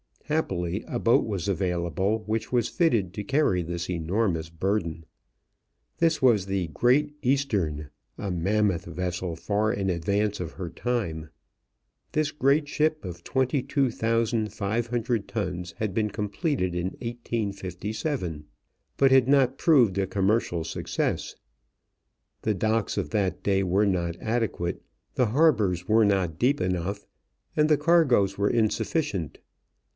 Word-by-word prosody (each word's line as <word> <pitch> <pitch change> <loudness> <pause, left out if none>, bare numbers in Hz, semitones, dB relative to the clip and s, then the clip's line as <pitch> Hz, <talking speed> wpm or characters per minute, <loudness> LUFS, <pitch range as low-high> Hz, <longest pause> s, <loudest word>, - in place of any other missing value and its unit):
Happily, 95 - -1
a - - -2
boat 115 - +3
was 100 -4 -3
available 95 +2 0
which 110 +1 -2
was 120 -2 +2
fitted 115 - +1
to 105 - -4
carry 130 -9 +2
this 85 0 -4
enormous 85 -1 -1
burden. 85 -1 -2 0.9
This 165 -2 +2
was 110 -7 +4
the 95 -3 -1
Great 135 - +2
Eastern, 105 - 0 0.3
a 100 -2 -3
mammoth 95 +1 +1
vessel 90 0 -3
far 105 +6 0
in 95 -1 -1
advance 100 +4 0
of 80 -3 -5
her 90 -3 -5
time. 85 -10 -3 0.8
This 155 -1 +1
great 145 +1 +2
ship 155 +1 0
of 85 -1 -8
22,500 115 -4 0
tons 90 -5 -4
had 105 -3 -2
been 105 0 0
completed 105 - -1
in 90 +2 -1
1857, 105 - -3 0.5
but 135 -1 +4
had 130 -2 +5
not 135 -1 +3
proved 125 - +4
a 95 -1 +1
commercial 95 -3 +1
success. - - -2 1.1
The 110 - +1
docks 110 +2 0
of 95 -7 -1
that 95 -4 -1
day 95 -1 +2
were 95 +3 +2
not 85 -4 0
adequate, 110 -6 -2 0.3
the 125 - +2
harbors 105 - +2
were 110 0 +5
not 95 -6 0
deep 140 +4 +2
enough, 90 +3 -2 0.5
and 150 0 +4
the 150 - +5
cargoes 140 - +3
were 100 0 +2
insufficient. 110 - -1
105 Hz, 130 wpm, -26 LUFS, 90-120 Hz, 1.1 s, had